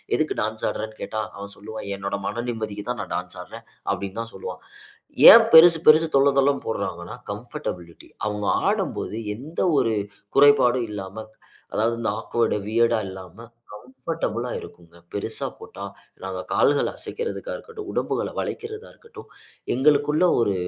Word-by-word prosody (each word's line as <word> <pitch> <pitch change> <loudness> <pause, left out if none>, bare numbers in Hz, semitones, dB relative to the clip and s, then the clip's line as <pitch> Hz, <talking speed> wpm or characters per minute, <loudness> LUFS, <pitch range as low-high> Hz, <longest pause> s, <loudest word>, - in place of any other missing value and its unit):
எதுக்கு 155 - 0
டான்ஸ் 110 +1 -2
ஆடுறன்னு 110 0 -6
கேட்டா, 110 - -3 0.2
அவன் 100 0 -7
சொல்லுவான் 110 0 -8
"என்னோட 100 +1 -3
மன 120 - -3
நிம்மதிக்கு 110 -3 -4
தான் 125 -2 -2
நான் - - -6
டான்ஸ் - - -5
ஆடுறேன்." - - -12 0.3
அப்டினு 100 +2 -5
தான் 115 0 -8
சொல்லுவான். 95 - -7 0.7
ஏன் - - +8
பெரிசு 165 +1 +9
பெரிசு 160 +1 +7
தொள்ள 135 +1 +5
தொளன்னு 140 +1 +2
போடுறாங்கனா 85 -3 -4 0.2
கம்ஃபர்டபிலிட்டி 105 - -7 0.2
அவுங்க 105 -1 -2 0.2
ஆடும்போது - - -2 0.2
எந்த 150 +8 -7 0.2
ஒரு 115 - +2 0.4
குறைபாடும் 130 -4 +5
இல்லாம, 95 -1 -7 0.6
அதாவது 115 +2 +1
இந்த 115 - -1
ஆக்வர்ட்டு 115 -1 0
வியர்டு 115 +2 +2
ஆ - - 0
இல்லாம, 95 0 -10 0.5
கம்ஃபர்டபிளா 130 -3 -3
இருக்குங்க. 85 -1 -14 0.2
பெரிசா 105 +2 -3
போட்டா, 100 - -9 0.4
நாங்க 95 -1 -4
கால்கள 145 0 +3
அசைக்குறதுக்கா 475 +1 -5
இருக்கட்டும், 455 -4 -10
உடம்புகள - - -1
வளைக்கிறதா 440 +1 -6
இருக்கட்டும். 460 0 -14 0.5
எங்களுக்குள்ள 145 +4 +3 0.2
ஒரு 100 -4 +2
115 Hz, 140 wpm, -24 LUFS, 105-145 Hz, 0.7 s, பெரிசு